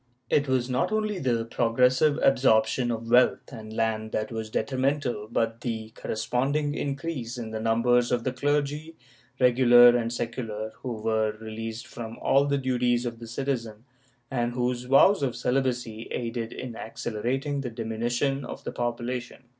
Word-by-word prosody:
It 145 -1 +3
was 130 -2 +1
not 125 +7 0
only 215 -2 0
the 120 -5 0
progressive 125 +5 +2
absorption 125 -2 +3
of 115 0 -3
wealth 125 +3 +4
and 110 -2 -8
land 110 -1 -1
that 110 +1 -2
was 110 -1 -4
detrimental 130 -3 -1
but 115 0 -1
the 110 -3 -4
corresponding 135 +8 -1
increase 140 -4 -4
in 115 -2 -5
the 110 - -3
numbers 120 +2 +2
of 120 -1 +1
the 130 - 0
clergy, 145 +4 -1 0.4
regular 120 -1 +7
and 115 -1 0
secular, 115 -2 -4
who 125 -2 -5
were 110 -1 0
released 110 +1 -6
from 115 0 -8
all 140 +1 +3
the 140 0 +1
duties 125 -2 +1
of 115 -1 -4
the 115 - -9
citizen, 115 -3 -3 0.5
and 120 -2 -1
whose 125 0 -1
vows 140 +8 +5
of 130 -4 -1
celibacy 125 -4 -1
aided 115 -1 -3
in 125 -2 -6
accelera 115 +3 -3
ting 140 0 -3
the 130 - -4
diminution 120 +4 -1
of 125 - -8
the - - -4
population. 120 +1 -4
120 Hz, 155 wpm, -27 LUFS, 115-130 Hz, 0.5 s, regular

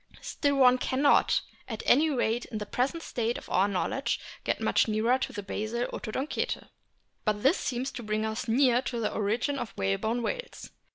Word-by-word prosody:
Still 285 -1 0
one 255 -2 +6
cannot, 275 +3 +3 0.3
at 220 -3 -5
any 305 +5 +5
rate 240 -4 0
in 220 - -6
the 210 - -4
present 275 +10 -1
state 235 0 -2
of - - -10
our 190 +2 +4
knowledge, 205 +7 -1 0.2
get - - 0
much - - +2
nearer 225 +4 +2
to - - -2
the 205 - -6
basal 220 +5 -2
Odontocete. 260 +6 -3 0.5
But 210 -1 0
this 275 +7 +5
seems 255 +1 -2
to 255 - -7
bring 215 0 -1
us 220 +2 -3
no 225 - +1
nearer 255 -2 +4
to 245 -3 -3
the 220 - -1
origin 230 +7 0
of 225 - -6
the - - -11
whalebone 220 - 0
whales. - - -5
240 Hz, 190 wpm, -28 LUFS, 215-265 Hz, 0.5 s, one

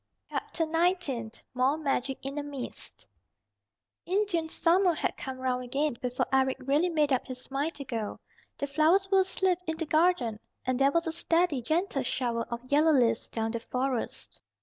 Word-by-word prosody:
CHAPTER 330 - -2
XIX 320 -9 0
MORE 255 +4 +2
MAGIC 275 -3 -2
IN 275 +2 -3
A - - -3
MIST 280 -3 -6 1.0
Indian 370 -3 +1
summer 345 +2 +3
had - - -1
come 265 -1 -6
round 255 -1 -1
again 275 +2 0
before 250 -1 0
Eric 265 0 +3
really 290 +7 +2
made 300 -4 +2
up 255 - 0
his 255 0 -7
mind 285 +4 -1
to 280 - -6
go. 225 -4 -4 0.4
The - - -1
flowers 320 +8 +3
were 390 - +6
asleep 375 -1 +2
in 320 0 -1
the 325 - -2
garden, 310 -8 +2 0.3
and 255 0 0
there 275 +1 +5
was 335 +2 +1
a 325 - -1
steady, 330 -3 +1
gentle 315 +3 0
shower 240 -2 -1
of 235 0 -5
yellow 300 +4 +4
leaves 235 -4 +2
down 225 -1 -2
the 230 - -2
Forest. 255 +1 -3
280 Hz, 170 wpm, -29 LUFS, 255-330 Hz, 1.0 s, were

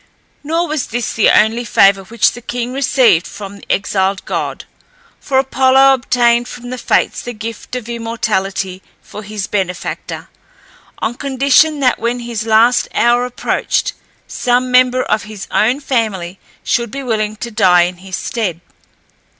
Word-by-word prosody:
Nor 330 +4 0
was 305 -3 -2
this 240 0 -3
the 225 - +3
only 225 +3 +3
favour 195 -3 +4
which 225 +2 +2
the 240 - -10
king 245 +1 -4
received 255 -9 +3
from 200 0 -9
the - - -7
exiled 195 -1 0
god, - - -4 0.5
for 265 - -1
Apollo 265 0 +4
obtained 240 -2 +2
from 245 0 -9
the 255 - -5
Fates - - +1
the 245 - -6
gift 225 +2 -7
of 245 -3 -5
immortality 210 -5 -2 0.2
for 210 - -9
his 210 -1 -5
benefactor, 185 -3 -4 0.7
on 220 - -2
condition 280 +3 +2
that 255 -2 +2
when 240 +1 -2
his 230 -2 -4
last 225 +3 +4
hour 240 +1 +3
approached, 250 - -1 0.3
some 250 +1 0
member 255 0 +4
of 215 0 -1
his 210 -2 -8
own 240 +6 +2
family 210 -10 -2 0.2
should 235 -1 0
be 275 +5 -6
willing 215 -3 -1
to 235 +2 -6
die 180 -4 +4
in 175 +1 -3
his 185 +1 -7
stead. 195 -8 -3
235 Hz, 150 wpm, -16 LUFS, 205-250 Hz, 0.7 s, favour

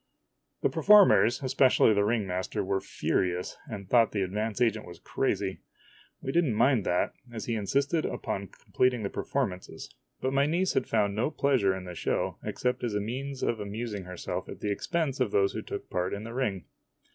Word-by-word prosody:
The - - +4
performers, 195 - +6
especially 130 -3 +4
the 100 0 +2
ring 110 0 +1
master, 95 0 -2
were 95 0 -1
furious, 90 0 -1
and 100 -6 -7
thought 115 +1 +4
the 100 -2 +1
advance 105 +3 -2
agent 110 -3 +1
was 85 -1 -10
crazy. - - -2 0.6
We 135 - -2
did 170 +4 +3
n't 125 -9 0
mind 125 -2 +3
that, 90 - +1 0.2
as 110 -3 -6
he 120 - -2
insisted 140 - 0
upon 100 0 -3
completing 125 +4 0
the 100 - -3
performances; 100 -10 -3 0.3
but 130 +1 -1
my 140 +1 +3
niece 180 +4 +1
found 105 -3 +1
no 110 +7 0
pleasure 130 -11 +2
in 95 - -7
the 90 - -7
show - - -2
except 125 0 -2
as 115 -4 -1
a - - +2
means 130 +6 -4
of 115 - 0
amusing 105 -1 -5
herself 90 -1 -5
at - - -8
the 105 - -2
ex 100 - -4
pense 160 -6 0
of 125 -4 +2
those 100 -1 +2
who - - -3
took - - -6
part 90 +2 -1
in 100 - -7
the 115 +1 -7
ring. 105 -8 -2
110 Hz, 190 wpm, -28 LUFS, 100-130 Hz, 0.6 s, performers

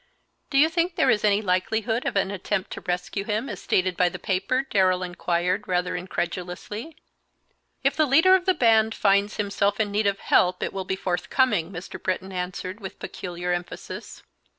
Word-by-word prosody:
"Do 275 - 0
you 300 +3 +7
think 335 +1 0
there 345 - +4
is 210 - +1
any 210 0 +3
likelihood 220 +5 0
of - - -2
an 195 0 +1
attempt 195 0 -2
to - - -6
rescue 180 +2 -2
him, 215 +4 -2
as 205 -7 -6
stated 185 -1 +1
by 180 0 +3
the - - -7
paper?" 200 +8 0
Darrell 185 -2 +2
inquired, 180 +2 -1
rather 180 0 0
incredulously. 180 - -4 0.9
"If - - +2
the 310 -1 +3
leader 320 +8 +6
of 375 -1 +3
the 375 - +4
band 225 -2 +4
finds 200 +1 +2
himself 200 0 0
in 210 -2 0
need 205 +1 +1
of 200 0 +1
help 180 -1 +2
it - - -3
will 190 -1 -4
be 190 - -1
forthcoming," 185 0 0
Mr. 180 -1 -8
Britton 185 +1 -2
answered, 185 +2 -4
with 195 -3 -8
peculiar 180 -1 -4
emphasis. 175 0 -6
195 Hz, 180 wpm, -25 LUFS, 180-220 Hz, 0.9 s, you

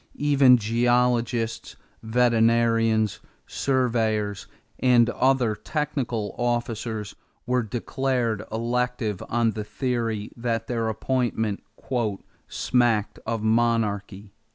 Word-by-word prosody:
Even 140 -3 +5
geologists, 120 +1 0 0.3
veterinarians, 115 -2 +2 0.3
surveyors, 110 -6 0 0.3
and 120 -2 +4
other 130 -4 +2
technical 125 -5 -3
officers 120 -3 -2 0.3
were 125 +1 +1
declared 120 0 -2
elective 120 -2 -1
on 115 -1 +2
the 105 0 -5
theory 115 -3 -2
that 115 -1 -2
their 115 -2 -1
appointment 110 -2 -1 0.9
"smacked 120 -4 +1
of 115 -1 -2
monarchy." 110 -3 0
115 Hz, 80 wpm, -25 LUFS, 110-125 Hz, 0.9 s, Even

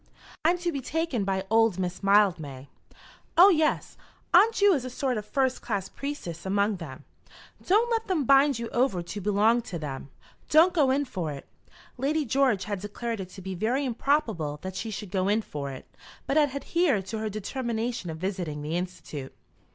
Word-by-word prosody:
"I'm 340 +3 +3
to 350 0 -2
be 280 -4 -4
taken 285 -6 -1
by 190 0 -1
old 225 -4 +4
Miss 180 -1 -3
Mildmay." 175 -10 +2 0.7
"Oh, 370 +4 +9
yes; 315 -4 +1 0.4
Aunt 420 +6 +6
Ju 405 -1 +5
is 275 -6 0
a 255 - -5
sort 255 0 -1
of 210 -1 -5
first 265 +1 0
class 200 -4 -3
priestess 275 - -6
among 200 +1 +1
them. 145 -5 -9 0.6
Don't 440 +6 +3
let 450 -1 0
them 340 -8 0
bind 275 0 +5
you 230 0 -4
over 240 -8 +1
to 205 +4 -6
belong 210 +4 +3
to 190 -7 -6
them. 140 -3 -6 0.4
Don't 330 +4 +6
go 295 -6 +3
in 280 +2 +2
for 180 - -4
it." 140 - -9 0.5
Lady 295 +3 0
George 255 -5 +2
had 205 -2 -3
declared 225 +2 -4
it 185 -2 -6
to 190 0 -11
be 190 0 -4
very 235 +10 0
improbable 230 - 0
that 190 0 -5
she 225 - -4
should 205 -2 -6
go 190 -1 0
in 215 +2 +2
for 140 -6 -5
it, 130 -1 -8 0.4
but 275 - -1
had 300 -2 +4
adhered 280 - +1
to 220 +3 -4
her 215 0 -2
determination 230 -1 -3
of 160 - -5
visiting 175 -5 -4
the 155 +3 -3
Institute. 175 -6 -5
220 Hz, 190 wpm, -27 LUFS, 185-275 Hz, 0.7 s, Oh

